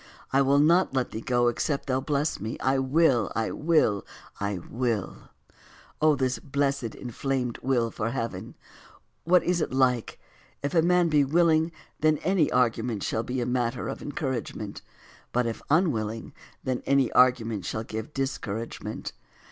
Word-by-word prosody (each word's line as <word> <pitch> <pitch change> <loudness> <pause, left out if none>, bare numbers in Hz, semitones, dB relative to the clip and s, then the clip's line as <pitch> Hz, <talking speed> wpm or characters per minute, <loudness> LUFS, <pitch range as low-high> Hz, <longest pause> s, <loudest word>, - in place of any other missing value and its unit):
I 135 - +5
will 140 +1 +4
not 165 +1 +4
let 130 -2 0
thee 110 - -5
go 120 0 +2
except 140 +4 -1
thou 130 0 0
bless 145 +2 -1
me." 110 +2 -4
I 135 0 +1
will, 135 -4 +3
I 110 +1 0
will, 150 -11 +2 0.4
I 100 -1 -1
will, 115 +2 -3 0.7
O 155 -1 +5
this 130 -2 -1
blessed 140 -4 -1
inflamed 125 0 -3
will 120 -3 +1
for 110 +1 -2
heaven! 115 -1 -4 0.7
What 180 +1 +5
is 175 -1 +1
it - - -1
like! 130 -3 +1 0.4
If 145 - -2
a 165 - +5
man 175 0 +3
be 150 -2 +4
willing, 160 +2 +3 0.3
then 155 0 +3
any 180 -3 +2
argument 115 -3 +1
shall 110 - -1
be 125 +1 -2
matter 120 -1 -1
of - - -5
encouragement; 125 -7 -4 0.5
but 125 0 +1
if 115 -1 -3
unwilling, 115 - 0 0.3
then 130 -1 -1
any 135 -2 +3
argument 115 -5 +3
shall 110 - -3
give 110 +3 -6
discouragement. 115 -5 -4
130 Hz, 150 wpm, -27 LUFS, 115-145 Hz, 0.7 s, I